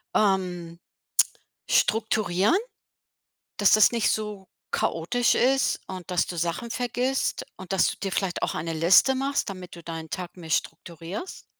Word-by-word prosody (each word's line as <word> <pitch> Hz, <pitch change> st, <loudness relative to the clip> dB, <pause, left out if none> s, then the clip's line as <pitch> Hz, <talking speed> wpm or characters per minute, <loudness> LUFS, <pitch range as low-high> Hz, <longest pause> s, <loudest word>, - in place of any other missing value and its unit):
ähm, 180 Hz, -4 st, 0 dB, 0.9 s
strukturieren, 215 Hz, -, +2 dB, 1.0 s
dass 205 Hz, -, +4 dB
das 215 Hz, -, +6 dB
nicht 230 Hz, -3 st, +1 dB
so 210 Hz, -3 st, -3 dB, 0.2 s
chaotisch 235 Hz, +9 st, +1 dB
ist 265 Hz, +2 st, +2 dB
und 185 Hz, -2 st, -8 dB
dass 180 Hz, -, +2 dB
du 175 Hz, -, -6 dB
Sachen 170 Hz, +8 st, -2 dB
vergisst 245 Hz, +2 st, -1 dB
und 185 Hz, 0 st, -10 dB
dass 195 Hz, -, +3 dB
du -, -, -9 dB
dir 195 Hz, -1 st, -4 dB
vielleicht 190 Hz, -3 st, -1 dB
auch -, -, -1 dB
eine 165 Hz, 0 st, -3 dB
Liste 175 Hz, -, +5 dB
machst, 275 Hz, -3 st, -1 dB
damit 185 Hz, -1 st, -8 dB
du 170 Hz, -, -12 dB
deinen 160 Hz, -1 st, -6 dB
Tag 180 Hz, +1 st, -6 dB
mehr 165 Hz, -2 st, -10 dB
strukturierst? 170 Hz, -, -4 dB
190 Hz, 145 wpm, -26 LUFS, 170-225 Hz, 1.0 s, das